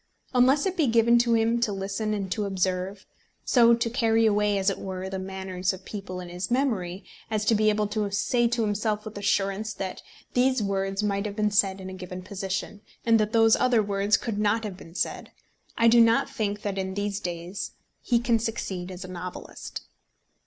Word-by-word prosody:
Unless 260 +5 +4
it 380 -1 -1
be 310 -5 +3
given 235 +1 +5
to 235 -1 +3
him 230 +1 +2
to 225 - +1
listen 195 +2 -2
and 195 -2 -4
to 210 +3 -1
observe, 190 0 -2 0.4
so 235 -2 +6
to 235 0 -1
carry 225 -1 +2
away, 210 -1 +2
as 195 +1 +2
it - - -5
were, 190 -1 -5
the 190 - -3
manners 190 -1 -3
of 190 0 -11
people 195 -3 -6
in 180 - -7
his 180 +2 -4
memory, 215 -8 0 0.3
as 215 -1 -1
to 225 - +4
be 215 0 +3
able 210 0 +1
to 210 -1 -1
say 235 +4 +1
to 235 -1 0
himself 210 0 -1
with 215 - -8
assurance 205 +1 0
that 190 -1 -5 0.3
these 255 -2 +2
words 195 0 -1
might 200 0 0
have 205 - -6
been 210 -1 +1
said 195 -2 +2
in 190 - -7
a 190 - -7
given 185 0 -7
position, 195 +1 -4 0.2
and 230 -1 +5
that 215 0 +1
those 225 -1 +5
other 240 -4 +3
words 200 0 +2
could 220 -3 -3
not 210 +2 +2
have 205 -3 -5
been 165 -1 -14
said, - - -2 0.5
I 230 - +4
do 235 +1 +7
not 230 0 +4
think 205 -1 -3
that 195 -2 -2
in 190 0 -3
these 205 0 -2
days 175 0 -5 0.3
he 240 - +2
can 235 -1 +2
succeed 195 -5 -3
as 185 0 -7
a - - -8
novelist. 180 0 -7
205 Hz, 205 wpm, -26 LUFS, 190-225 Hz, 0.5 s, do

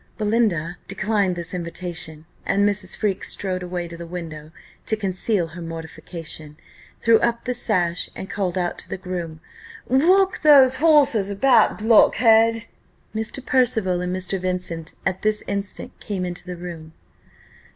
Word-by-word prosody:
Belinda 205 -6 0
declined 200 -3 0
this 170 0 -5
invitation, 170 -2 -6 0.2
and 200 +1 +2
Mrs. 200 -2 -1
Freke 200 -3 -1
strode 185 -2 -2
away 180 -1 -4
to 170 - -9
the 170 0 -8
window 160 -3 -7 0.4
to 220 - +1
conceal 195 -2 -1
her 170 +3 -9
mortification, 165 -2 -7 0.4
threw 230 -1 +5
up 235 0 0
the 250 - -1
sash, 180 -7 0
and 190 - -6
called 195 -3 -2
out 175 -1 -1
to - - -7
her - - -4
groom, 175 -4 -6 0.5
"Walk 370 +9 +3
those 275 -4 +7
horses 285 -10 +4
about, 230 +6 +4
blockhead!" 225 +1 +4 0.5
Mr. 220 +4 -4
Percival 220 -8 +2
and 180 0 -2
Mr. 185 +1 -2
Vincent 180 -3 -4
at 185 - -1
this 215 0 0
instant 200 -1 -4
came 190 -3 -3
into 175 0 -6
the 180 - -5
room. 165 -2 -8
185 Hz, 145 wpm, -22 LUFS, 175-220 Hz, 0.5 s, those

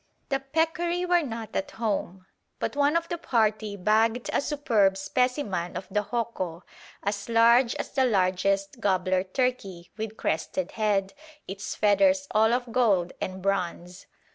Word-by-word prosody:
The 270 -2 +1
peccary 330 +5 0
were 355 -1 +3
not 230 -6 -6
at 290 - -1
home, 200 -7 -3 0.3
but - - -3
one 290 +2 +2
of 335 0 +1
the 345 0 -4
party 215 -8 0
bagged 220 +5 +1
a - - +2
superb 225 -10 +2
specimen 195 - -1
of - - -6
the 210 - +1
hoco, 195 -8 -3 0.4
as 200 +2 -3
large 235 +2 +5
as - - -5
the 265 -2 +2
largest 195 0 +1
gobbler 185 -3 +1
turkey, 195 -5 -2
with 220 0 -5
crested 170 +3 -2
head, 205 -3 0 0.3
its 195 +2 -5
feathers 280 +7 +3
all 220 +1 +4
of 245 0 -1
gold 200 -8 +2
and 185 0 -4
bronze. 180 -2 -2
215 Hz, 145 wpm, -26 LUFS, 195-255 Hz, 0.4 s, large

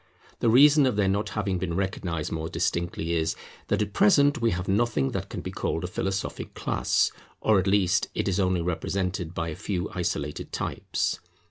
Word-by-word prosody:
The 115 - +2
reason 140 +4 +7
of 125 - 0
their 100 -2 +2
not 100 +2 0
having 95 -3 0
been 85 -2 -2
recognized 90 -4 -2
more 80 0 -3
distinctly 85 -1 -1
is, 80 -1 0 0.3
that - - +1
at 100 -1 -7
present 145 - +4
we 115 - +3
have 90 -1 -2
nothing 100 - +1
that - - -4
can - - -5
be - - -5
called 80 - -2
a - - -1
philosophic 95 +2 -3
class, - - +1 0.3
or 110 -3 +4
at 95 - -1
least 95 -1 +3
it - - -1
is 95 0 +1
only 90 -2 +2
represented 90 0 -2
by 80 0 -2
a 75 - -5
few 95 -1 -3
isolated 75 -4 -3
types. - - -2
95 Hz, 190 wpm, -26 LUFS, 85-105 Hz, 0.3 s, reason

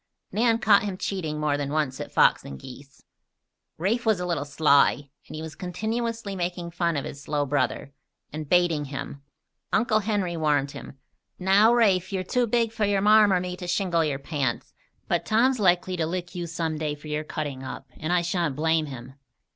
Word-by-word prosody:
Nan 230 +1 +2
caught 210 -3 +5
him 200 -3 -4
cheating 160 -7 -3
more 150 -1 +1
than 145 -1 -3
once 150 -4 -1
at - - -7
fox - - +4
and 70 -1 -8
geese. 135 +1 -13 0.7
Rafe 215 +8 0
was 220 -5 +2
a 180 - -2
little 170 -5 -1
sly, 145 -1 +3 0.2
and - - -9
he 155 - -5
was 160 -1 -7
continually 220 - -3
making 175 -1 -3
fun 170 -2 0
of 140 - -3
his 140 - -8
slow 145 0 -1
brother, 140 0 -1 0.4
and 155 -1 -6
baiting 175 -4 +3
him. 140 0 -7 0.5
Uncle 215 -1 +2
Henry 200 -5 -1
warned 145 -3 +1
him: 135 - -10 0.4
"Now, 195 +4 +5
Rafe, 200 -6 +3
you're 190 -1 -1
too 245 +6 0
big 230 0 +1
for 220 -2 0
your 200 -1 +1
Marm 210 0 +6
or 185 - +3
me 180 0 -4
to 180 - -7
shingle 175 -2 +1
your 145 -3 -1
pants; 140 -4 -3 0.3
but - - 0
Tom's 245 +3 +2
likely 185 -1 +2
to 160 -2 0
lick 175 +1 -4
you 175 -2 -4
some 165 -1 -3
day 150 -2 -2
for 150 +1 -13
your 150 0 -2
cutting 145 -4 -5
up 130 - -8
and 155 +2 -3
I 180 -1 +2
sha'n't 170 -4 -1
blame 160 +1 +1
him. 130 -1 -9
170 Hz, 195 wpm, -25 LUFS, 150-200 Hz, 0.7 s, Marm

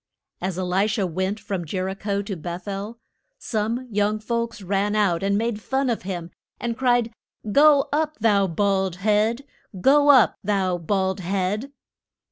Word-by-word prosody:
As 185 -1 -3
E 185 - -1
li 185 +3 +1
sha 210 -2 0
went 190 +4 -2
from 195 -3 -4
Jer 185 +3 -3
i 190 - -2
cho 200 0 -2
to 200 -1 -5
Beth 175 +3 -7
el, 200 +3 -5 0.4
some 230 +3 -2
young 205 +1 +1
folks 230 -1 -3
ran 200 +2 0
out 195 -6 +2
and 200 +1 +1
made 225 -1 -2
fun 265 +2 0
of 230 - -2
him, 175 -3 -5 0.3
and 235 -1 -2
cried, 245 -2 +1 0.4
Go 285 +2 +5
up, 310 0 0
thou 205 -3 +3
bald 190 0 0
head! 215 +6 +1 0.4
Go 285 +7 +5
up, 260 -5 +6
thou 190 -3 0
bald 190 +2 -1
head! 195 +7 -2
205 Hz, 165 wpm, -23 LUFS, 190-230 Hz, 0.4 s, up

